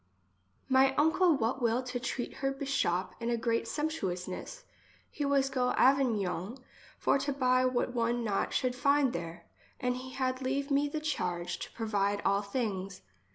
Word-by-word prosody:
My 265 Hz, 0 st, +4 dB
uncle 320 Hz, +2 st, +4 dB
what 255 Hz, +2 st, -1 dB
will 235 Hz, +2 st, +1 dB
to 250 Hz, -1 st, -4 dB
treat 245 Hz, 0 st, -4 dB
her 270 Hz, 0 st, 0 dB
beshop 270 Hz, -10 st, -1 dB
in 235 Hz, 0 st, -2 dB
a 235 Hz, -, +1 dB
great 230 Hz, 0 st, 0 dB
sumptuouness, 260 Hz, -, -3 dB, 0.5 s
he 290 Hz, -, -3 dB
was 275 Hz, -1 st, +2 dB
go 250 Hz, -2 st, +1 dB
Avignon 230 Hz, -6 st, +2 dB, 0.4 s
for -, -, +2 dB
to 285 Hz, -, -1 dB
buy 255 Hz, -2 st, +2 dB
what 250 Hz, -1 st, 0 dB
one 235 Hz, 0 st, 0 dB
not 205 Hz, -3 st, 0 dB
should 255 Hz, -1 st, 0 dB
find 280 Hz, 0 st, +3 dB
there, 170 Hz, 0 st, -6 dB, 0.3 s
and 250 Hz, 0 st, 0 dB
he 260 Hz, 0 st, -8 dB
had 255 Hz, -1 st, -1 dB
leave 275 Hz, +2 st, -1 dB
me 285 Hz, +1 st, +2 dB
the 305 Hz, +1 st, -3 dB
charge 180 Hz, -, -2 dB
to -, -, -7 dB
provide 205 Hz, -3 st, 0 dB
all 200 Hz, +1 st, +3 dB
things. 200 Hz, -3 st, -3 dB
250 Hz, 160 wpm, -31 LUFS, 205-275 Hz, 0.5 s, My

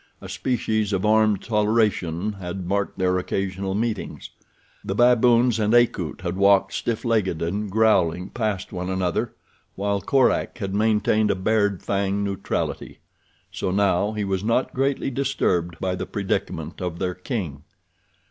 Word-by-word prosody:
A 95 Hz, -, -10 dB
species 110 Hz, +1 st, -1 dB
of 95 Hz, +1 st, 0 dB
armed 110 Hz, -2 st, +3 dB
toleration 105 Hz, -4 st, +1 dB
had 90 Hz, 0 st, -5 dB
marked 100 Hz, +2 st, -1 dB
their 90 Hz, 0 st, +1 dB
occasional 95 Hz, +1 st, -3 dB
meetings. 110 Hz, -1 st, -3 dB, 0.5 s
The 95 Hz, -, -3 dB
baboons 120 Hz, 0 st, +4 dB
and 110 Hz, +2 st, +2 dB
Akut 95 Hz, -, +2 dB
had 90 Hz, 0 st, -3 dB
walked 100 Hz, 0 st, +4 dB
stiff 115 Hz, -1 st, -2 dB
legged 105 Hz, -8 st, +1 dB
and 100 Hz, +5 st, -2 dB
growling 95 Hz, -4 st, +2 dB
past 105 Hz, -5 st, -3 dB
one 90 Hz, 0 st, -4 dB
another, 95 Hz, -2 st, -1 dB, 0.4 s
while 100 Hz, 0 st, -1 dB
Korak 130 Hz, +5 st, +2 dB
had 100 Hz, -4 st, -4 dB
maintained 110 Hz, 0 st, +2 dB
a -, -, +2 dB
bared 105 Hz, 0 st, +1 dB
fang 100 Hz, 0 st, 0 dB
neutrality. 100 Hz, -1 st, -3 dB, 0.5 s
So 95 Hz, -, -3 dB
now 100 Hz, +1 st, +1 dB
he 105 Hz, -1 st, -2 dB
was 95 Hz, -1 st, -2 dB
not 115 Hz, +4 st, 0 dB
greatly 135 Hz, +1 st, 0 dB
disturbed 90 Hz, -11 st, -1 dB
by 95 Hz, -1 st, -1 dB
the 90 Hz, -, -4 dB
predicament 100 Hz, -2 st, -3 dB
of 90 Hz, -2 st, -3 dB
their 90 Hz, 0 st, -2 dB
king. 90 Hz, -, -5 dB
100 Hz, 145 wpm, -23 LUFS, 95-110 Hz, 0.5 s, baboons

